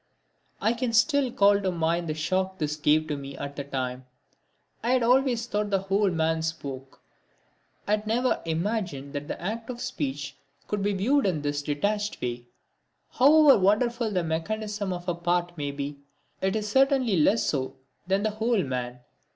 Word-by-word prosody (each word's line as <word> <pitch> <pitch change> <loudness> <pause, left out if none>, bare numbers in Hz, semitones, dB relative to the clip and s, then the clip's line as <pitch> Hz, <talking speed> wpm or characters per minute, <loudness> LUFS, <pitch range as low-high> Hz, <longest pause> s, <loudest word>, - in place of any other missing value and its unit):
I 225 - +2
can 240 -1 -2
still 265 +2 +3
call 200 -2 +4
to 190 -2 0
mind 170 0 0
the 155 - -1
shock 185 +4 -1
this 150 -2 -2
gave 155 +1 +2
me 140 -1 -5
at 140 0 -6
the 140 - -4
time. 130 -2 -4 0.7
I 240 +2 +1
had 255 -2 +3
always 250 -1 +3
thought 210 -3 -1
the 195 - +2
whole 195 +1 +1
man 160 -1 0
spoke 140 -5 -6 0.8
had 210 +1 0
never 245 +3 +1
even 165 0 -1
imagined 175 -10 -3
that 145 0 -4
the - - -5
act 225 +6 -4
of 245 -1 -5
speech 145 - -4 0.3
could 210 -1 -2
be 205 +1 +1
viewed 245 +7 +2
in 155 -6 -1
this 145 0 -1
detached 205 +9 -1
way. 120 0 -4 0.6
However 290 0 +6
wonderful 230 +4 +2
the 185 -4 0
mechanism 205 +5 -2
of 175 0 -5
a 175 - +1
part 175 0 -1
may 145 -3 -3
be, 140 0 -5 0.4
it 190 +1 0
is 210 -1 -1
certainly 265 -3 +3
less 195 +8 +3
so 130 -3 -1 0.3
than 195 +2 +1
the 215 - +1
whole 220 0 +1
man. 125 -2 -4
190 Hz, 175 wpm, -27 LUFS, 150-220 Hz, 0.8 s, However